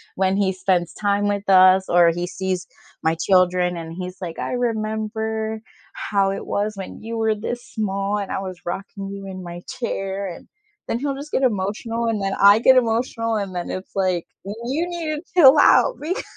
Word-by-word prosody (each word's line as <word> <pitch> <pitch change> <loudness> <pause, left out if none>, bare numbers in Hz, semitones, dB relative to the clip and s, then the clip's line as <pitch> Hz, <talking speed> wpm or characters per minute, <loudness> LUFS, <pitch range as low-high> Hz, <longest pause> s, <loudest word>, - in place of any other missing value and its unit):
when 190 0 +1
he 195 -2 +2
spends 180 -2 0
time 205 0 0
with 205 0 -2
us, 185 0 +6
or 175 -1 +6
he 175 +1 -2
sees 185 0 -3 0.4
my 160 +1 +2
children 180 0 +2
and 165 -1 -7
he's 180 +1 -6
like, 170 -3 -6
"I - - -3
remember 220 -1 -2 0.3
how 195 -2 0
it 195 - -5
was 210 +1 -1
when 195 -1 -8
you 230 +1 -5
were 220 -1 +1
this 240 +3 -5
small 200 -1 -2
and 200 -2 -4
I - - -1
was 185 -2 -6
rocking 195 +2 -5
you 200 0 -7
in 185 -1 -7
my 175 0 -8
chair 195 -4 -3
and" 175 - -9 0.4
then - - -1
he'll 275 0 -2
just 285 +2 -8
get 265 - 0
emotional 225 +2 -1
and 220 -2 -1
then 195 0 -1
I 200 +2 +8
get 260 +2 +6
emotional 230 -1 0
and 195 -3 -4
then 175 - -4
it's 185 +1 -6
like, 185 -3 0 0.2
"You 240 - -3
need 330 -3 -3
to 300 - -6 0.2
chill 290 -2 +8
out, - - +5
beca" 340 +5 -2
200 Hz, 195 wpm, -22 LUFS, 185-225 Hz, 0.4 s, I